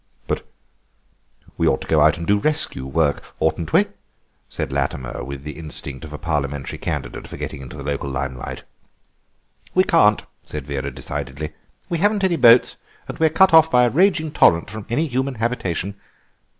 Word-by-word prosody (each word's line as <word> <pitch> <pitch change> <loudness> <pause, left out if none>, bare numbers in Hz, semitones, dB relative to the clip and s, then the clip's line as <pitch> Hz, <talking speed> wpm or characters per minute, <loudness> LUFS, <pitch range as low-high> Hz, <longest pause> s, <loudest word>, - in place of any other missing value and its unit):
"But - - -3 1.1
we - - +3
ought - - +2
to - - -8
go 80 -2 +3
out 75 +1 +5
and 85 - -5
do 100 +3 +3
rescue 150 - 0
work, 70 +1 -1
oughtn't - - 0
we?" - - +5 0.6
said - - -4
Latimer, 65 -3 -2
with 70 +1 -7
the 75 - -5
instinct 75 -4 -5
of 80 - -9
a 75 - -6
Parliamentary 75 -3 -3
candidate 70 -6 -4
for - - -9
getting - - -5
into 65 - -9
the 70 - -7
local 70 0 -3
limelight. 65 -1 -5 1.1
"We 185 - +6
can't," 165 - +4 0.2
said 75 -3 -6
Vera 70 -1 -3
decidedly, 70 +3 -5 0.3
"we 170 - -2
haven't 205 +2 +2
any 185 -2 +3
boats 120 -5 +6 0.3
and - - -7
we're 160 -1 +4
cut 190 +3 +4
off 160 0 +7
by 125 -4 +5
a 120 - +3
raging 170 -2 +2
torrent 85 - +4
from 110 -1 -8
any 125 +8 +1
human 130 -1 -2
habitation. 100 -5 -2
85 Hz, 175 wpm, -21 LUFS, -, 1.1 s, off